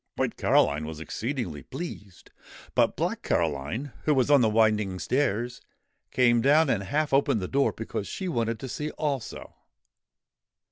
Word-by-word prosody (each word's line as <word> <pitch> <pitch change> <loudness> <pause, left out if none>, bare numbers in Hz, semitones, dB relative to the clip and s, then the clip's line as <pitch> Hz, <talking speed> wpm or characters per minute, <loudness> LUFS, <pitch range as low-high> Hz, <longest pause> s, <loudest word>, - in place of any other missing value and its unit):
White - - -1
Caroline 75 +2 +2
was 80 -1 -7
exceedingly 110 - -4
pleased! 105 - -8 0.4
But - - +2
Black - - -2
Caroline, 80 - -1
who 150 - +3
was 130 +2 +2
on 140 -3 +7
the 110 - +4
winding 105 -3 +2
stairs, 120 +1 -1 0.5
came 120 -2 +3
down 145 +3 +4
and 100 - 0
half 145 +9 -1
opened 135 -5 +3
the 90 - -3
door 140 +5 +2
because 110 -2 -5
she 190 - -4
wanted 115 -7 -1
to 135 - -5
see 150 +4 -4
also. 145 -6 -4
120 Hz, 150 wpm, -27 LUFS, 100-140 Hz, 0.5 s, on